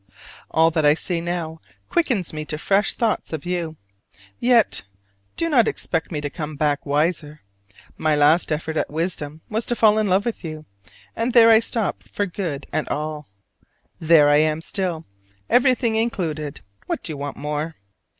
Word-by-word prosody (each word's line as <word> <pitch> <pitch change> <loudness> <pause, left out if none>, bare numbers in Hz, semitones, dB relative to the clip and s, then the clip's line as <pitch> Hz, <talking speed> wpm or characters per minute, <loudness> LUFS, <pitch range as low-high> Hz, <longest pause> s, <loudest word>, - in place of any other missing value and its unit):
All 160 +1 +3
that 155 -1 0
I 145 0 +5
see 170 +1 -3
now 165 -2 -4 0.3
quickens 245 - 0
me 155 0 -4
to 155 - -4
fresh 195 +5 +1
thoughts 225 -7 -1
of 160 0 -4
you. 175 -3 -2 0.6
Yet 240 -2 +3 0.5
do 330 - -1
not 250 -8 +4
expect 165 0 -2
me 155 - -2
to 145 - -3
come 155 -1 -5
back 145 0 0
wiser: 150 +1 0 0.6
my 155 -1 +2
last 150 +4 +4
effort 155 +1 -2
at - - 0
wisdom 155 -1 -3
was 220 +1 -2
to 240 - +1
fall 215 -2 +4
in 215 - +1
love 195 +2 +2
with 235 -4 -3
you, 155 -2 -7 0.5
and 230 +2 -1
there 230 -2 +8
I 220 - +7
stopped 225 -1 -2
for 205 - -1
good 170 -6 -4
and 155 - -1
all. 150 0 -4 0.7
There 160 -2 +5
I 145 0 +5
am 155 +1 +2
still, 175 -2 -3 0.5
everything 250 -2 +3
included: 165 -10 -2 0.3
what - - -3
do 165 - -5
you 150 - -5
want 140 0 -5
more? 150 +2 -3
165 Hz, 170 wpm, -22 LUFS, 150-210 Hz, 0.7 s, there